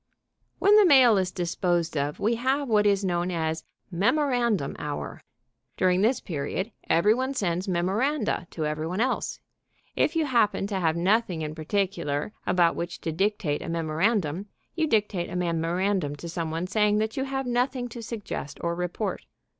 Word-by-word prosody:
When 405 +2 +5
the 420 - +7
mail 260 -7 +7
is 185 -1 0
disposed 175 -1 -1
of 145 0 -1
we 220 +3 +2
have 265 +4 0
what 210 -3 +3
is 200 -1 +2
known 175 -1 0
as 160 -2 -2 0.3
Memorandum 235 - +1
Hour. 145 -1 -5 0.6
During 185 0 +3
this 235 +5 +3
period 170 +6 -3 0.2
every 205 +6 +5
one 260 +3 -2
sends 185 -4 -1
memoranda 200 - 0
to 155 - -3
every 155 +1 -2
one 180 +4 -3
else. 255 +3 -1 0.6
If 330 - +1
you 320 -1 +2
happen 230 -7 +2
to 200 -1 -2
have 165 -2 +1
nothing 185 -2 +1
in 155 0 -4
particular 160 -1 -2
about 175 -2 +3
which 170 0 -4
to 165 - -2
dictate 190 -3 0
a - - -6
memorandum, 165 +2 0 0.3
you 320 -2 0
dictate 205 - 0
a 175 - -6
memorandum 175 -1 0
to 145 +4 -8
some 165 -1 -3
one, 165 +2 -2
saying 210 +2 +2
that 220 +2 -1
you 270 -1 -1
have 270 0 -3
nothing 245 +1 0
to 235 0 -8
suggest 215 -10 -6
or 170 0 0
report. 180 +3 -3
190 Hz, 170 wpm, -26 LUFS, 170-230 Hz, 0.6 s, the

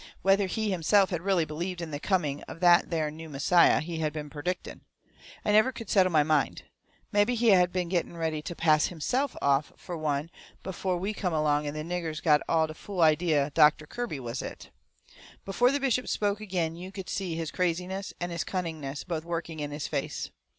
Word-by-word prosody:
Whether 195 0 +4
he 215 +2 -1
himself 190 +3 +3
had 175 -3 -2
really 185 -3 +2
believed 170 +4 -4
in 170 -2 -5
the 145 - -4
coming 150 -6 0
of - - -9
that 175 -1 +5
there 155 -3 -1
new 160 +1 -9
Messiah 155 +5 +4
he 165 +1 -5
had 155 -1 0
been 150 -2 -6
perdicting, 175 +5 -4 0.6
I - - +2
never 215 +5 +5
could 230 -4 -8
settle 190 -2 +5
in - - -7
my 150 -2 +5
mind. 150 -1 0 0.5
Mebby 205 +4 +3
he 235 0 +3
had 180 -3 +5
been 180 -1 -1
getting 170 -1 -2
ready 160 -2 -2
to 175 +3 -6
pass 155 -2 +3
HIMSELF 250 - -2
off 140 +1 +2
fur 175 - -7
one 155 0 -2 0.3
before 185 -1 -2
we 195 +4 -2
come 185 -4 -2
along 150 -1 +1
and 145 - -4
the 155 - -3
niggers 165 -2 -3
all 150 -2 +6 0.2
got - - 0
the - - -6
fool 185 +3 -5
idea 155 -2 +3
Doctor 150 -1 +5
Kirby 235 - -4
was 120 0 -4
it. - - -8 0.7
Before 240 +6 +3
the 285 - 0
bishop 255 -2 0
spoke 205 0 0
agin 175 -6 -2
you 180 +2 -8
could 190 -2 -7
see 185 -4 -3
his 165 -1 -3
craziness 180 +2 -2
and 175 0 -3
his 170 -1 -2
cunningness 160 -6 -4
both 165 -3 -4
working 165 -1 -4
in 145 -1 -3
his 145 0 -4
face. - - -3
170 Hz, 205 wpm, -28 LUFS, 155-190 Hz, 0.7 s, all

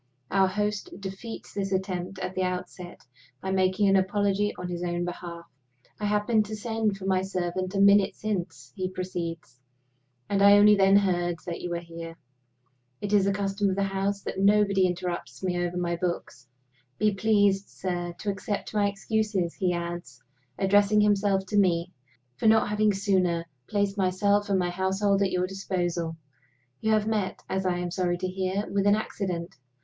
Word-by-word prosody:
Our 195 -1 +4
host 205 0 -3
defeats 200 +4 -7
the 200 - -2
attempt 185 -1 -3
at 190 0 -4
the 185 - -2
outset 180 -1 -4 0.4
by 190 - -4
making 190 +1 +2
an 195 - +4
apology 200 +1 +1
on 180 - -5
his 175 -1 -4
own 175 0 -1
behalf. 170 -1 -7 0.5
"I 210 - -2
happened 210 +1 +2
to 215 - -5
send 220 -2 -1
for 190 - -8
my 190 -1 +2
servant 185 0 -3
a - - +1
minute 200 0 +5
since," 175 -11 -4
he 185 -1 -2
proceeds, 170 -7 -5 0.7
"and 200 -1 0
I 200 0 +8
only 210 +1 +7
then 195 -1 +5
heard 175 -3 +2
that 170 -1 -5
you 175 - -4
were 170 - -1
here. 165 -1 -9 0.8
It 205 0 -3
is 200 -1 +4
a - - +3
custom 200 0 0
of 190 - -1
the 200 - 0
house 195 +1 -1
that - - -4
nobody 200 -1 +4
interrupts 175 -7 -4
me 180 -1 0
over 175 0 -3
my 175 -1 -1
books. 170 -7 -4 0.5
Be 210 -1 +2
pleased, 200 -1 +2
sir, 175 -2 -4
to 205 - -2
accept 195 +2 -4
my 205 -1 +2
excuses," 200 -3 -1
he 185 -2 0
adds, 170 -7 -5 0.4
addressing 205 +2 +4
himself 200 -2 +2
to 205 +2 +1
me, 175 -2 +2 0.5
"for - - +1
not 220 -1 +5
having 210 0 +2
sooner 185 -4 +1 0.2
placed 200 -1 0
myself 200 +2 +2
and 195 - +3
my 175 -1 0
household 195 +2 +1
at 195 - +3
your 180 0 +1
disposal. 175 -4 -2 0.6
You 220 - 0
have 215 -1 +2
met, 215 -3 -2
as 190 0 -1
I 180 -1 +1
am 175 0 -3
sorry 175 -1 0
to 185 +1 -2
hear, 190 +2 -2
with 200 0 0
an 205 - +6
accident. 180 -5 -4
190 Hz, 175 wpm, -27 LUFS, 180-205 Hz, 0.8 s, I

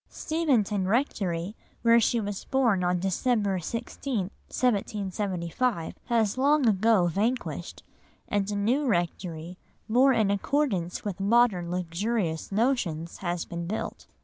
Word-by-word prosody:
Steventon 235 - 0
Rectory, 195 -5 -1 0.3
where 230 0 +6
she 235 +1 +2
was 205 -2 -4
born 235 -9 +2
on 180 0 +2
December 195 +1 0
16, 230 - -3 0.2
1775, 200 -3 -1
has 230 -1 +1
long 285 -1 +4
ago 215 -2 +4
vanished, 215 +9 -2 0.4
and 205 -2 0
a 205 - -2
new 245 +8 +1
rectory, 175 -3 -2 0.3
more 255 +5 +5
in 215 -5 +2
accordance 200 - -1
with 200 -2 -3
modern 200 -4 +3
luxurious 180 0 -2
notions, 195 - 0
has 175 -2 -3
been 170 0 -5
built. 215 +4 -4
205 Hz, 120 wpm, -27 LUFS, 180-235 Hz, 0.4 s, where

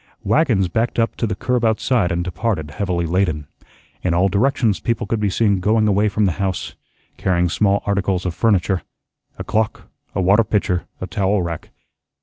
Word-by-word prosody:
Wagons 115 - +2
backed 110 +7 -1
up 115 0 +1
to 115 - 0
the 105 - -2
curb 125 +4 -1
outside 110 -2 +2
and 85 +1 -1
departed 90 -3 -2
heavily 90 0 -1
laden. 80 -4 0 0.6
In 85 -2 0
all 95 +3 +3
directions 110 - +1
people 115 +4 -1
could 110 +2 -1
be 105 -1 +1
seen 100 0 +2
going 110 +3 +2
away 105 +1 +3
from 105 +1 +1
the 95 - +2
house, 95 -2 -2 0.4
carrying 90 -2 +1
small 100 +2 +1
articles 100 -2 0
of 90 - -1
furniture 95 -2 +1 0.6
a - - -5
clock, 110 +1 -2 0.2
a - - 0
water 100 +5 +4
pitcher, 95 -4 -1
a - - -4
towel 95 +1 0
rack. 85 -2 -5
100 Hz, 175 wpm, -20 LUFS, 90-110 Hz, 0.6 s, water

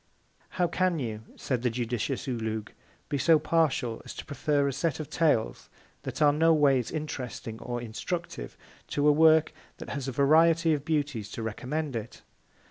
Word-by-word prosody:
How 180 - +3
can 180 0 +1
you, 110 -6 -4
said 125 -3 -2
the 125 - +1
judicious 120 +3 -3
OULOUG, 110 -4 -3 0.4
be 145 - -2
so 165 +3 +5
partial, 155 -8 0
as - - -9
to - - -7
prefer 145 -1 0
a 140 - -1
Set 150 +2 -1
of 155 - -6
Tales, 145 - +1 0.3
that - - -2
are 145 -1 +5
no 165 +2 +4
ways 135 -5 +3
interesting 125 -7 -5
or 120 -1 -4
instructive, 120 - -5 0.3
to 145 0 +1
a - - +8
Work, 160 +1 +5 0.2
that - - -9
has 140 -2 -4
a - - -1
Variety 160 +5 +4
of 145 -2 -2
Beauties 145 - -1
to 115 - -5
recommend 130 +6 -3
it? 115 0 -6
140 Hz, 170 wpm, -28 LUFS, 120-160 Hz, 0.4 s, a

